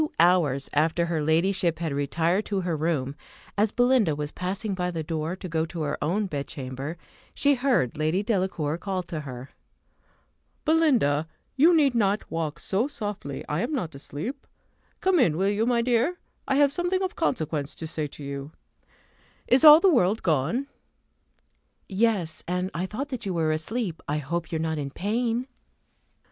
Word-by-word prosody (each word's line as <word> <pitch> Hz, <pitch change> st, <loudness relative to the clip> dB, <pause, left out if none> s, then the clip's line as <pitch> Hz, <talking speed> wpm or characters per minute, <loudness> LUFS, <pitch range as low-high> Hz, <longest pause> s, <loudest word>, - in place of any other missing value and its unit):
Two 305 Hz, -, -3 dB
hours 165 Hz, -6 st, +3 dB
after 160 Hz, +3 st, +2 dB
her 165 Hz, -2 st, -1 dB
ladyship 170 Hz, +2 st, +2 dB
had 160 Hz, -3 st, -2 dB
retired 165 Hz, +7 st, +1 dB
to 200 Hz, -2 st, -1 dB
her 175 Hz, -2 st, -1 dB
room, 150 Hz, -4 st, -1 dB, 0.4 s
as 210 Hz, +1 st, +2 dB
Belinda 245 Hz, -, +3 dB
was 150 Hz, 0 st, -3 dB
passing 195 Hz, +3 st, -3 dB
by 180 Hz, -1 st, -1 dB
the 165 Hz, -2 st, -3 dB
door 160 Hz, +2 st, -3 dB
to 190 Hz, -, -7 dB
go 160 Hz, -2 st, 0 dB
to 165 Hz, -1 st, -4 dB
her 145 Hz, -, -1 dB
own 190 Hz, +8 st, 0 dB
bedchamber, 140 Hz, -1 st, -5 dB, 0.4 s
she 285 Hz, 0 st, +3 dB
heard 245 Hz, -, +1 dB
Lady 160 Hz, +6 st, +1 dB
Delacour 185 Hz, -7 st, -1 dB
call 190 Hz, -2 st, -2 dB
to 170 Hz, -2 st, -5 dB
her. 130 Hz, -3 st, -8 dB, 1.1 s
"Belinda, 250 Hz, -, +3 dB, 0.3 s
you 325 Hz, +6 st, +6 dB
need 285 Hz, -5 st, +4 dB
not 205 Hz, -3 st, 0 dB
walk 165 Hz, -1 st, -3 dB
so 205 Hz, +7 st, 0 dB
softly; 205 Hz, -, -5 dB
I 150 Hz, +3 st, -1 dB
am 245 Hz, +7 st, -2 dB
not 180 Hz, -, -2 dB
asleep. 155 Hz, -, -6 dB, 0.5 s
Come 370 Hz, -2 st, +3 dB
in, 165 Hz, -, +3 dB
will 195 Hz, +2 st, +2 dB
you, 210 Hz, +3 st, +1 dB
my 240 Hz, -1 st, +2 dB
dear? 250 Hz, +8 st, +1 dB, 0.3 s
I 270 Hz, -, +2 dB
have 285 Hz, 0 st, +4 dB
something 355 Hz, +5 st, 0 dB
of 375 Hz, -, -3 dB
consequence 155 Hz, -, -1 dB
to 160 Hz, -, -7 dB
say 155 Hz, -1 st, -3 dB
to 145 Hz, -, -11 dB
you. 140 Hz, +2 st, -6 dB, 0.9 s
Is 260 Hz, +5 st, +4 dB
all 305 Hz, 0 st, +11 dB
the 390 Hz, -, +4 dB
world 210 Hz, -3 st, +2 dB
gone?" 165 Hz, -, +1 dB, 1.2 s
"Yes; 195 Hz, -6 st, 0 dB
and 180 Hz, +2 st, -1 dB
I 180 Hz, +3 st, -2 dB
thought 270 Hz, +9 st, -4 dB
that 255 Hz, -6 st, -5 dB
you 185 Hz, -, -2 dB
were 160 Hz, -2 st, +1 dB
asleep. 170 Hz, +3 st, -3 dB
I 150 Hz, -, 0 dB
hope 160 Hz, +3 st, -3 dB
you -, -, -2 dB
are 160 Hz, 0 st, -1 dB
not 160 Hz, -1 st, -2 dB
in 140 Hz, -1 st, -3 dB
pain." 230 Hz, -, -1 dB
180 Hz, 175 wpm, -26 LUFS, 155-235 Hz, 1.2 s, all